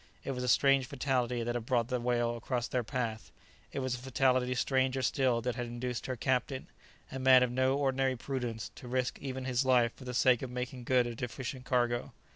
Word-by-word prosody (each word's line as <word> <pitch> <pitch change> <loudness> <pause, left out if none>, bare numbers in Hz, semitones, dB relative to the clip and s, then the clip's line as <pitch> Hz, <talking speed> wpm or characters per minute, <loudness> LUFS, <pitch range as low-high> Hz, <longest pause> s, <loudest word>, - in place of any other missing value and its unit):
It - - -3
was 125 -1 -3
a - - -2
strange 135 +1 +4
fatality 125 -3 -1
that 120 +1 -1
had 120 -1 -4
brought 120 -2 +1
the 125 -1 0
whale 120 -1 +1
across 120 +1 -2
their 125 -1 -1
path; 115 -3 -3 0.4
it - - -3
was 130 -1 -1
a 125 - -3
fatality 130 -1 +1
stranger 130 0 +1
still 125 -1 +2
that 125 +1 -1
had 120 -1 -4
induced 120 0 -4
her 130 - -2
captain, 130 +2 -1 0.5
a 130 - -5
man 130 -1 +7
of 125 - 0
no 130 +2 +2
ordinary 135 -2 +1
prudence, 120 -3 -4
to 125 - -10
risk 130 0 -1
even 130 -1 -5
his 125 0 +1
life 125 -3 +3
for 130 - -12
the 125 -1 -4
sake 130 -1 +4
of 130 - -4
making 125 0 -5
good 125 -1 +3
a 120 - -4
deficient 125 +2 -5
cargo. 120 -1 0
125 Hz, 215 wpm, -31 LUFS, 120-130 Hz, 0.5 s, man